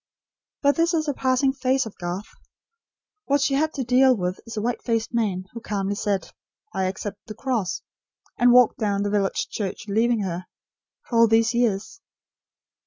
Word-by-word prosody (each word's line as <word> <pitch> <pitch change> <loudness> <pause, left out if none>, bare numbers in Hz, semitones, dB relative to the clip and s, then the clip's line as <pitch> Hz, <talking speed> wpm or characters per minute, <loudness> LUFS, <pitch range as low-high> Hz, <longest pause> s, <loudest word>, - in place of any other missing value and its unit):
But 285 +2 +4
this 335 +1 +2
is 315 -1 0
a 290 - +1
passing 260 +1 +1
phase 265 -1 +1
of 220 - -9
Garth. 180 +3 -4 1.0
What 285 +1 +2
she 275 0 +1
has 310 +3 +2
to 270 - -1
deal 255 +1 +4
with 180 -1 -2
is 230 - -7
the 210 - -2
white 245 +1 -1
faced 230 -1 -1
man, 200 -6 0
who 230 - -7
calmly 200 -3 -2
said: 200 -1 -2 0.4
"I 190 - 0
accept 200 +2 -5
the 215 - -7
cross," 230 -6 -2 0.5
and 245 0 +5
walked 250 -1 +5
down 200 -2 0
the 205 - -1
village 200 -2 0
church 205 +2 -4
leaving 225 +2 +2
her 180 -2 -4 0.6
for 235 - -2
all 230 - +7
these 225 +2 +3
years. 235 - 0
230 Hz, 175 wpm, -24 LUFS, 200-255 Hz, 1.0 s, all